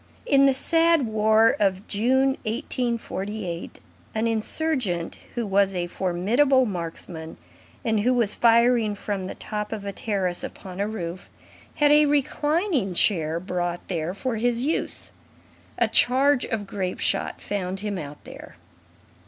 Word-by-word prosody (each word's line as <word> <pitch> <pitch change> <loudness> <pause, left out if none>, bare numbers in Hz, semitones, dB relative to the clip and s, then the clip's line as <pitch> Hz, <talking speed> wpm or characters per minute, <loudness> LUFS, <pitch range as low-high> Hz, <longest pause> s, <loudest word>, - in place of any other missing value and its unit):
In 275 0 +5
the 270 - +4
sad 330 +1 +3
war 220 +1 +3
of 195 0 0
June, 260 +6 +2 0.2
1848, 220 - -3 0.4
an 220 +1 0
insurgent 225 - -1 0.2
who 240 -2 -1
was 195 -1 +2
a 175 -1 -1
formidable 215 +11 +2
marksman, 165 -4 -6 0.5
and 220 -2 +2
who 240 +5 +2
was 235 -5 +3
firing 235 -2 +3
from 200 -1 -4
the - - -6
top 210 -1 -5
of 210 -2 -5
a 200 - -3
terrace 195 -4 -2
upon 185 -1 -8
a 205 - 0
roof, 180 -4 -6 0.5
had 295 -1 +4
a 300 0 +6
reclining 295 - 0
chair 165 -4 +2
brought 175 -1 -3
there 170 0 -2
for 245 +2 -2
his 240 +2 0
use; 315 - 0 0.7
a - - +3
charge 270 +2 +4
of 215 -3 -3
grape 190 -2 -4
shot - - -1
found 190 -1 -3
him 205 -3 -3
out 145 -2 -9
there. - - -11
215 Hz, 140 wpm, -24 LUFS, 185-250 Hz, 0.7 s, a